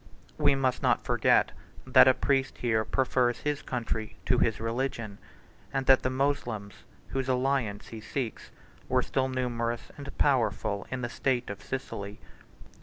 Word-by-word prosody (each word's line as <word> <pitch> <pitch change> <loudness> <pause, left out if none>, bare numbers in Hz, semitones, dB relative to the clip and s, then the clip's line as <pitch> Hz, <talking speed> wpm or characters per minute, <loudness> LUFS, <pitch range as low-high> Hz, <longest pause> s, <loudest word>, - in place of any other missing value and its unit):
136 150 - -5
We 145 -1 +5
must 130 -2 +1
not - - +2
forget, - - +3 0.3
that - - +7
a 130 - +6
priest 135 -1 0
here 110 -3 +1
prefers 125 0 +1
his 150 -1 -1
country 115 -3 -3
to 125 - +3
his 115 -2 +1
religion; 115 -2 -3 0.5
and 135 0 -1
that 135 0 +6
the 130 - 0
Moslems, 130 -6 -1 0.4
whose 135 -1 -2
alliance 125 -5 0
he 110 -1 -8
seeks, 120 +1 -4 0.4
were 130 0 +3
still 130 -1 0
numerous 120 -2 -2
and 140 -1 -7
powerful 110 -6 +1
in 130 -1 -4
the - - 0
state 125 -2 -1
of 100 - -8
Sicily. 105 -6 -5
125 Hz, 155 wpm, -29 LUFS, 115-135 Hz, 0.5 s, that